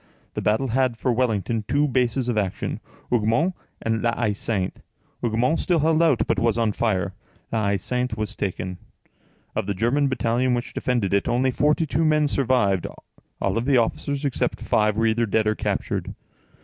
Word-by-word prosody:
The - - -3
battle 110 +5 +1
had, 130 -1 +1
for 125 +1 0
Wellington, 115 -2 0
two 145 +3 +2
bases 125 -1 +1
of 120 - 0
action, 100 -3 -2 0.3
Hougomont 120 - +2 0.3
and 115 0 0
La 115 0 +1
Haie 110 -3 +1
Sainte; 100 -2 -2 0.4
Hougomont 120 +7 +1
still 175 - +2
held 160 +1 +3
out, 155 -8 +3
but - - 0
was 115 -1 +1
on 115 -2 +2
fire; 95 -4 0 0.4
La 110 -3 0
Haie 100 0 +2
Sainte 125 +3 -2
was 110 0 -3
taken. 90 -2 -3 0.8
Of - - -1
the 100 - -1
German 125 +8 +2
battalion 125 -1 +1
which 120 0 -4
defended 120 -7 0
it, 100 - +2
only 130 +2 +2
forty 150 +5 +2
two 160 +2 0
men 155 -1 +3
survived; 125 -10 +1 0.5
all 100 +4 0
the 130 +2 +3
officers, 140 +4 0
except 140 - -1
five, 105 0 +1
were 115 - +2
either 115 +1 +2
dead 110 +1 +1
or 110 - +2
captured. - - -3
120 Hz, 175 wpm, -24 LUFS, 110-130 Hz, 0.8 s, held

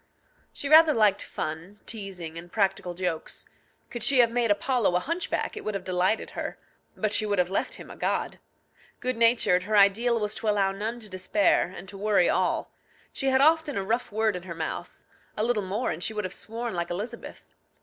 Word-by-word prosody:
She 285 - -5
rather 310 0 +7
liked 210 -3 +3
fun, 165 +7 -5
teasing, 190 -7 -6
and 170 +1 -9
practical 195 -4 0
jokes. 175 -3 -3 0.4
Could 240 - -5
she 255 +4 +5
have 235 -2 +6
made 235 -1 +1
Apollo 210 -2 +1
a - - +4
hunchback, 335 - -2
it 430 - -7
would 215 - -3
have 195 - -4
delighted 185 +4 0
her. - - -5 0.4
But 215 -1 0
she 215 - +2
would 205 -1 0
have 180 0 +1
left 195 - -1
him - - -10
a - - -9
god. - - -2 0.6
Good 255 0 -1
natured, 230 -6 +4
her 210 +3 0
ideal 225 +4 +4
was 210 -1 -2
to 220 - -1
allow 200 -2 +2
none 215 +5 -4
to 215 - -6
despair, 185 -1 +1
and 180 - -9
to 195 +1 -9
worry 205 -3 +3
all. - - 0 0.4
She 270 - -2
had 265 0 +3
often 315 -2 +3
a 195 - -1
rough 230 +5 -1
word 220 -1 +1
in 180 - -5
her 175 -2 -8
mouth; 160 -1 -5 0.3
a 210 - +1
little 235 -2 +1
more, 200 +6 -2
and 165 +3 -5
she 220 - -2
would 210 - -2
have 185 - -4
sworn 230 +2 -5
like 170 -1 -2
Elizabeth. 200 +7 -7
210 Hz, 205 wpm, -27 LUFS, 185-235 Hz, 0.6 s, rather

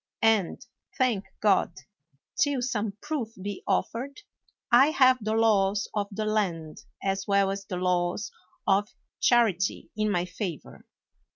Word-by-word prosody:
And, 220 0 +2 0.3
thank 240 -6 +1 0.2
God! 200 -5 +3 0.6
till 285 -4 +1
some 220 -4 -2
proof 275 -8 -3
be 200 +1 -5
offered, 275 - -2 0.5
I 250 +4 +7
have 255 -5 +4
the 215 +1 -1
laws 205 -3 +2
of 205 -1 -1
the 215 +1 -3
land 180 -8 -2 0.2
as 195 0 -1
well 200 -1 +3
as 195 0 -5
the 180 - -4
laws 180 +2 0 0.3
of 200 +1 +2 0.3
charity 215 -6 +2
in 215 0 0
my 180 -3 0
favor. 180 -3 -7
205 Hz, 130 wpm, -27 LUFS, 195-230 Hz, 0.6 s, I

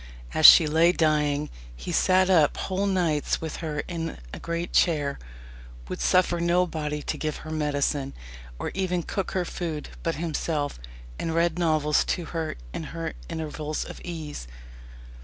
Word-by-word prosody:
As 155 - +9
she 165 - +10
lay 160 +3 +4
dying, 150 -3 +1 0.2
"he - - -6
sat 185 0 +4
up 165 -6 +4
whole 195 +1 -1
nights 170 -6 +1
with 160 -1 -5
her 150 -3 -3
in 165 -2 -5 0.2
a - - -6
great 170 +1 -4
chair, 145 -5 +2 0.7
would - - -5
suffer 180 -1 +3
nobody 170 -4 0
to - - -3
give 155 -1 -2
her 155 - -6
medicine, 145 -2 -1 0.4
or - - -4
even 180 -2 -1
cook 195 +3 -3
her 185 -2 0
food, 165 -4 -4
but 165 - -1
himself, 155 - -2 0.4
and 165 -1 -2
read 170 0 +2
novels 155 -3 +2
to 175 - -1
her 165 -2 -2 0.2
in - - -4
her - - -3 0.2
intervals 155 -1 -4
of - - -9
ease." 155 - -6
160 Hz, 155 wpm, -26 LUFS, 150-175 Hz, 0.7 s, she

